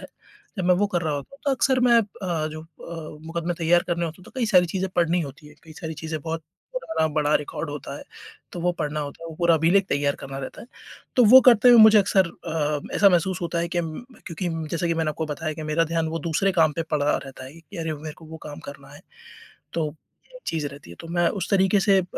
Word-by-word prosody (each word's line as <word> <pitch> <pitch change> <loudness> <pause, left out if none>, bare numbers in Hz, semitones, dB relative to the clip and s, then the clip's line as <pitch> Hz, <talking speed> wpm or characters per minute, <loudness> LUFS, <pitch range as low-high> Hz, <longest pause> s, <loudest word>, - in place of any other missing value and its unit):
है, - - -9 0.5
जब 185 - -1
मैं 180 0 +5
वो 205 +3 +2
कर 175 - +1
रहा 155 -2 -1
होता 140 -1 -6
हूँ 275 - -18
तो - - +3
अक्सर 260 -1 +2
मैं 240 -1 +5
अ, 180 -6 -3
जो 155 0 -7
अ, 160 -1 -10
मुकदमे 170 +1 -3
तैयार 170 +1 +3
करने 170 0 0
होते 160 - -7
हैं 180 - -16
तो - - -14
कई 235 - +1
सारी 180 -4 +5
चीज़ें 190 +2 -2
पढ़नी 175 +1 +2
होती 150 +2 -9
है। 150 - -16
कई 160 - -12
सारी 160 +1 -6
चीज़ें 160 0 -5
बहुत 160 0 -4 0.3
पुराना 325 - 0
बड़ा 150 -1 +2
रिकॉर्ड 150 +1 -5
होता 145 -2 -6
है, - - -9 0.5
तो 175 - -5
वो 180 - +2
पढ़ना 150 +1 -2
होता 145 +2 -7
है, - - -6
वो 160 - -8
पूरा 170 -1 +4
अभिलेख 175 +5 +3
तैयार 140 0 0
करना 135 0 -7
रहता 135 - -7
है। - - -12 0.5
तो 250 - +6
वो 255 +5 +9
करते 245 -1 +6
हुए 240 - +8
मुझे 220 -1 +8
अक्सर 195 -2 +3
अ, 150 -3 -3
ऐसा 200 - +6
महसूस 180 +1 +1
होता 170 0 -2
है 170 - -2
कि 175 0 -1
उम, 165 - -3 0.2
मैं - - -19
क्योंकि 175 0 -3
उम, 165 -1 -4
जैसे 170 +1 -1
कि 165 - +1
मैंने 160 -1 0
आपको 160 +1 -4
बताया 155 +1 -3
कि 155 - -7
मेरा 155 +2 +1
ध्यान 165 0 -1
वो 165 +1 -3
दूसरे 170 +5 0
काम 160 -4 +3
पे 165 - -2
पड़ा 150 -1 +1
रहता 135 -1 -9
है 130 - -10
कि 190 +4 -13
अरे 160 -1 -2
मेरे 150 0 -8
को 160 - -14
वो 160 +1 -9
काम 145 - -8
करना 140 -1 -11
है, 145 - -13 0.7
तो 160 -2 0 0.5
ये - - -11
चीज़ 155 -3 -1
रहती 140 -11 -12
है। - - -10
तो - - -10
मैं 175 -1 +2
उस 195 - -4
तरीके 195 0 +4
से 195 -1 +4
अ, - - -1
165 Hz, 260 wpm, -24 LUFS, 155-180 Hz, 0.7 s, वो